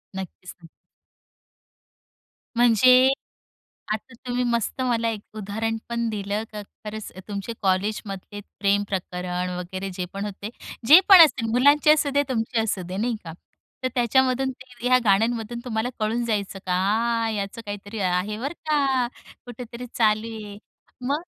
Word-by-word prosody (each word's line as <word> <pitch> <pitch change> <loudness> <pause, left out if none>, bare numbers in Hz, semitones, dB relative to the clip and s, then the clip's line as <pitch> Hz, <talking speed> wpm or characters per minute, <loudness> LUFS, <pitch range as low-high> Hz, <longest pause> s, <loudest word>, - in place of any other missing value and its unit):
नक्कीच 185 -1 -7
न 165 - -13 1.9
म्हणजे, 250 +2 +6 0.8
आता 220 +3 -5
तुम्ही 245 0 0
मस्त 235 +1 -1
मला 235 -3 +1
एक 220 -2 -3 0.2
उदाहरण 220 +2 -2
पण 235 0 -1
दिलं, 205 0 -2
का 210 -1 -6
खरंच 210 +1 -9 0.2
तुमचे 200 +2 -4
कॉलेजमधले 200 +1 -2 0.2
प्रेम 200 0 +3
प्रकरण 180 -1 -3
वगैरे 185 +2 -5
जे 180 - -3
पण 200 +1 -4
होते, 205 +1 -6 0.4
जे 310 +8 +10
पण 385 -3 +11
असेल 265 -6 0
मुलांचे 285 +5 +5
असुदे, 285 -2 +2
तुमची 230 -2 0
असू 210 -4 -1
दे 185 +1 -5
नाही 230 +4 0
का. 165 - -7 0.5
तर 255 - +1
त्याच्यामधून 260 +2 +2
ते 255 -1 -13
ह्या 255 0 +6
गाण्यांमधून 225 +3 +1
तुम्हाला 225 -1 -1
कळून 225 +3 0
जायचं 205 -4 -2
का 225 +5 +1
याचं 205 +2 -4
काहीतरी 205 +1 -6
आहे 185 +3 0
बरं 275 +5 -3 0.2
का, 270 -4 +2 0.4
कुठेतरी 245 0 -8
चालू 215 -1 +2
आहे 205 -2 -8 0.5
मग? 290 +5 -1
220 Hz, 135 wpm, -24 LUFS, 200-245 Hz, 1.9 s, पण